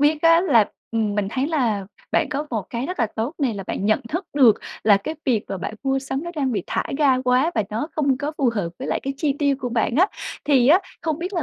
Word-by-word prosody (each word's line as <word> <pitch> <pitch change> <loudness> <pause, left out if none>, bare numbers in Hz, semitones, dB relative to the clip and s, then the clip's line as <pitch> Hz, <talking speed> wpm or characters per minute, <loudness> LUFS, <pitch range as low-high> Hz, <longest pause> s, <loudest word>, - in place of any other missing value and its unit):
biết 300 +2 +3
á 330 +1 +6
là 240 - +4 0.2
ừm, 220 -3 0
mình 205 -2 0
thấy 265 +2 -1
là 230 - 0 0.3
bạn 315 - +2
có 295 +1 -2
một 220 -5 -1
cái 240 +3 -3
rất 365 - -5
là 230 - +3
tốt 235 +9 -2
này 260 -7 0
là 195 -1 -6
bạn 195 - -3
nhận 215 +4 +3
thức 350 +7 -3
được 245 -7 +6 0.3
là 205 -2 +7
cái 255 +11 -4
việc 235 -6 +1
mà 195 - -4
bạn 205 - -5
mua 270 0 +1
sắm 270 +3 -4
nó 345 - -4
đang 270 -4 0
bị 200 -5 -1
thả - - -1 0.2
ga 265 -4 +4
quá 255 +5 +3
và 220 - +2
nó 225 +8 -2
không 275 -4 +2
có 295 +1 -3
phù 265 -5 +3
hợp 185 -5 -1
với 265 - -5
lại - - 0
cái 275 0 -3
chi 285 -3 0
tiêu 285 -2 +2
của 250 - -3
bạn 235 +1 0
á, 370 +4 +6 0.4
thì 270 -3 +4
á 355 +6 +7 0.2
không 320 -2 -1
biết 360 +3 -4
là 340 -5 -1
270 Hz, 275 wpm, -22 LUFS, 225-300 Hz, 0.4 s, là